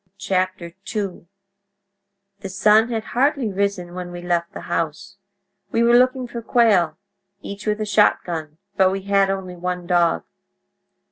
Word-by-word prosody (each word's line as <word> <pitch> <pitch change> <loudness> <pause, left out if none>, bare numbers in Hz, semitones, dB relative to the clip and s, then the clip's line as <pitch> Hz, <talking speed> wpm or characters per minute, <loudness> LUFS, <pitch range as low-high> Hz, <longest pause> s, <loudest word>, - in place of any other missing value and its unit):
II 185 +1 -3 1.1
"...The 195 -1 -7
sun 210 +4 +4
had 225 -2 -2
hardly 255 -3 0
risen 195 -3 -2
when 180 -1 -6
we 175 - -7
left 170 -1 -1
the - - -8
house. 165 +3 -3 0.5
We 230 - +2
were 235 0 +5
looking 255 +1 +3
for 235 -1 -6
quail, 205 -10 +3 0.5
each 200 +1 -7
with 210 0 0
a - - 0
shotgun, 170 -7 +1 0.2
but 190 -1 +4
we 195 0 -3
had 195 -1 +2
only 190 -2 -4
one 180 0 -4
dog. 175 -2 +2
195 Hz, 140 wpm, -21 LUFS, 175-215 Hz, 1.1 s, were